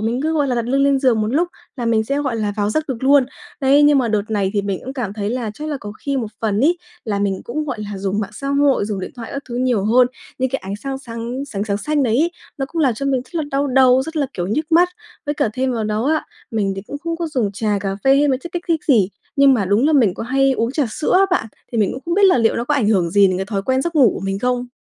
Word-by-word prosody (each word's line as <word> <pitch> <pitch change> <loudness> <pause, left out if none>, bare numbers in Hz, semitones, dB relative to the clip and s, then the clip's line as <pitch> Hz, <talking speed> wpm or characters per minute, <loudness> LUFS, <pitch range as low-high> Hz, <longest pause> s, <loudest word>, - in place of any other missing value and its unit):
mình 230 +4 -1
cứ, 315 +1 0
gọi 295 -3 +1
là, 250 - 0
đặt 235 -1 -1
lưng 270 +3 +2
lên 275 -1 +3
giường 250 -5 +2
một 215 - 0
lúc 330 +8 +1 0.3
là 240 -2 -3
mình 220 -1 +2
sẽ, 275 +5 -1
gọi 265 -5 -2
là, 210 -2 -1
vào 205 0 0
giấc 310 +6 -1
được 260 - -2
luôn. 275 -1 +5 0.4
Đấy, 280 +1 +5
nhưng 290 -1 +5
mà 240 -3 +1
đợt 210 -2 +1
này 200 -3 0
thì 205 - +1
mình 195 -2 -3
cũng 265 - -5
cảm 240 -7 -4
thấy 205 0 -3
là 240 -3 -2
chắc 305 +6 -6
là 295 - -2
có 205 0 -7
khi 280 -1 -2
một 235 -4 -1
phần 215 -2 0
ấy 335 +6 +3 0.3
là 205 -3 -1
mình 200 -1 -1
cũng, 300 +6 -3
gọi 255 -7 -4
là, 200 - -5
dùng 200 +2 -1
mạng 200 -1 -4
xã 275 +6 -6
hội, 280 -5 +2
dùng 205 -2 -3
điện - - -5
thoại 235 -2 -7
các 280 0 -4
thứ 240 - -6
nhiều 245 -6 +1
hơn, 245 +3 +5 0.3
những 260 -1 0
cái 270 - -1
ánh 195 +1 -4
sang 270 +4 -5
sáng 235 +1 -5
sáng 200 -4 -3
sáng 200 -2 -1
xanh 295 +7 0
đấy 230 -2 +2
ấy, 335 +3 +2 0.3
nó 270 - -1
cũng 330 -1 -1
làm 260 -5 +3
cho 275 +5 -4
mình 265 -2 +1
rất - - -23
là 320 - 0
đau 275 +1 0
đầu, 260 -1 +4
rất 320 +3 -7
là, 285 -3 +1
kiểu, 175 0 -2
nhức 305 - -2
mắt. 350 +2 +6 0.4
Với 290 - -1
cả 285 -6 +1
thêm 260 +1 -1
vào 225 -3 -2
đó 215 +4 -1
á, 310 - -2 0.3
mình 205 -3 0
thì 195 - -5
cũng 285 - -6
không 335 +1 -3
có 335 0 -3
dùng 240 -9 -1
trà, 210 0 -1
cà 195 -1 -3
phê 270 0 +5
hay 290 +1 +3
mấy 260 -2 +1
chất 340 +6 -9
kích 350 0 -3
thích 325 -2 0
gì, 220 -10 +4 0.3
nhưng 275 -1 +6
mà 210 -6 0
đúng 205 +9 +2
là 315 - +3
mình 230 -11 +4
có - - -5
hay 270 +3 +2
uống 230 0 -1
trà 280 -3 +1
sữa 300 - -1
á 390 +1 +5
bạn, 290 -11 +1 0.3
thì 235 - -1
mình 205 -3 +2
cũng 265 - -7
không 340 +1 -1
biết 405 0 +4
là 370 -8 +5
liệu 225 -1 +2
nó 235 - -1
có 295 - 0
ảnh 235 -7 +1
hưởng 185 -6 +2
gì 200 +2 +5
đến 185 -1 0
cái 190 +1 -3
thói 200 -3 -2
quen 260 +4 +1
giấc 340 +2 -3
ngủ 265 -8 +6
của - - -5
mình 195 0 -2
không? 250 +2 -1
250 Hz, 315 wpm, -19 LUFS, 215-280 Hz, 0.4 s, mắt